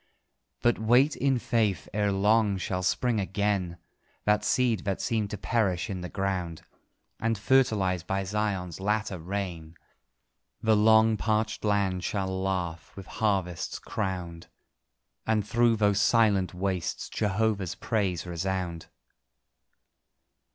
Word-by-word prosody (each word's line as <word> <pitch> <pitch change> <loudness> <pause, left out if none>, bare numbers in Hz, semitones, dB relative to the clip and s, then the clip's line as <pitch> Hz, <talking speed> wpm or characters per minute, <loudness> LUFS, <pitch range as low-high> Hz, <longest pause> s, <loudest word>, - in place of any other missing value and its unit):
But 120 0 +3
wait 125 +7 +4
in 135 -1 +1
faith: 110 -5 0
ere 105 0 +1
long 105 +1 +3
shall 90 0 -2
spring 115 +5 +1
again 95 -3 -1 0.5
The 105 0 +4
seed 125 -4 +2
that 100 -1 -3
seemed 110 -4 -1
to 105 - -5
perish 100 -4 0
in 95 -2 -4
the 90 - -6
ground; 95 -4 -3 0.6
And 115 -1 0
fertilised 100 -7 +2
by 95 0 -1
Zion's 95 -3 -2
latter 105 -1 -1
rain, 85 -3 -5 0.8
The 110 -1 +3
long 110 +1 +5
parched 110 0 -1
land 100 -3 +1
shall 95 0 -2
laugh, 95 -4 -3
with 95 - -9
harvests 95 -6 -1
crowned, 90 -5 -4 0.8
And 110 -2 +1
through 120 0 +3
those 105 -2 +2
silent 100 -2 +3
wastes 90 -2 -2
Jehovah's 105 -3 -1
praise 95 -7 -1
resound. 90 -1 -3
100 Hz, 120 wpm, -28 LUFS, 90-110 Hz, 0.8 s, long